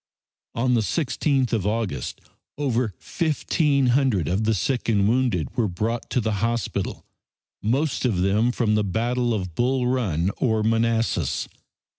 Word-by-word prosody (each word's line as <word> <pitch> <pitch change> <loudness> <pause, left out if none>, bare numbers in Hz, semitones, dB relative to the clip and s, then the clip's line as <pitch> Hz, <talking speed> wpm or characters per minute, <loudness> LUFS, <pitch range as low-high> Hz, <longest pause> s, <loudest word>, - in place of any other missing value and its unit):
On 125 +2 +1
the 115 - +3
16th 135 0 0
of 105 -4 0
August 105 - -2 0.4
over 125 -8 0
fifteen 150 -3 0
hundred 125 - +2
of 95 +5 0
the 110 0 +2
sick 120 +7 -1
and 100 -3 +3
wounded 120 -8 0
were 120 -4 +1
brought 110 +6 -3
to - - +1
the 110 -3 -1
hospital, 115 0 -2 0.6
most 135 +8 0
of 120 -7 +1
them 105 +6 +2
from 115 -3 +1
the 105 0 +2
Battle 120 +5 0
of 95 -6 -2
Bull 125 +6 +1
Run 100 -9 0
or 110 -4 +1
Manassas. 115 +1 +1
115 Hz, 145 wpm, -24 LUFS, 105-125 Hz, 0.6 s, the